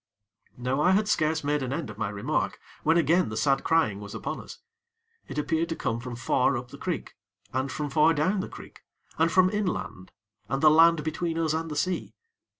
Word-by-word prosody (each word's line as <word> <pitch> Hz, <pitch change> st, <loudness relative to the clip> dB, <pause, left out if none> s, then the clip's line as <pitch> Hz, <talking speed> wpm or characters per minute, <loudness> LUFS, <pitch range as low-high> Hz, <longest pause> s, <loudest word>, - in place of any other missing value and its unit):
Now, 130 Hz, +3 st, -1 dB
I 185 Hz, +5 st, +4 dB
had 210 Hz, +2 st, +2 dB
scarce 160 Hz, -3 st, +1 dB
made 145 Hz, 0 st, 0 dB
an 130 Hz, -1 st, -3 dB
end 140 Hz, -5 st, -3 dB
of 105 Hz, -, -12 dB
my -, -, -1 dB
remark, 100 Hz, 0 st, -2 dB, 0.2 s
when 160 Hz, +2 st, +3 dB
again 170 Hz, -1 st, +3 dB
the 110 Hz, -, -5 dB
sad 135 Hz, +2 st, +2 dB
crying 110 Hz, -12 st, +2 dB
was 100 Hz, 0 st, -8 dB
upon -, -, -4 dB
us. -, -, -11 dB, 0.7 s
It -, -, -7 dB
appeared 160 Hz, +2 st, 0 dB
to 165 Hz, -, -2 dB
come 115 Hz, -6 st, -2 dB
from 125 Hz, 0 st, -6 dB
far 125 Hz, +2 st, +1 dB
up 120 Hz, 0 st, -7 dB
the 140 Hz, -, -11 dB
creek, 180 Hz, -2 st, -4 dB, 0.4 s
and 130 Hz, +1 st, -1 dB
from 150 Hz, -2 st, -4 dB
far 155 Hz, +3 st, +5 dB
down 175 Hz, +7 st, +1 dB
the 190 Hz, -, -4 dB
creek, -, -, -12 dB, 0.4 s
and 165 Hz, +1 st, +3 dB
from 185 Hz, +1 st, +4 dB
inland 185 Hz, -, -3 dB, 0.4 s
and 135 Hz, -, 0 dB
the 155 Hz, -, +8 dB
land 165 Hz, 0 st, +5 dB
between 165 Hz, +1 st, -2 dB
us 160 Hz, -2 st, +1 dB
and 160 Hz, +1 st, -2 dB
the 150 Hz, -, -5 dB
sea. 180 Hz, +4 st, -2 dB
155 Hz, 210 wpm, -27 LUFS, 130-165 Hz, 0.7 s, the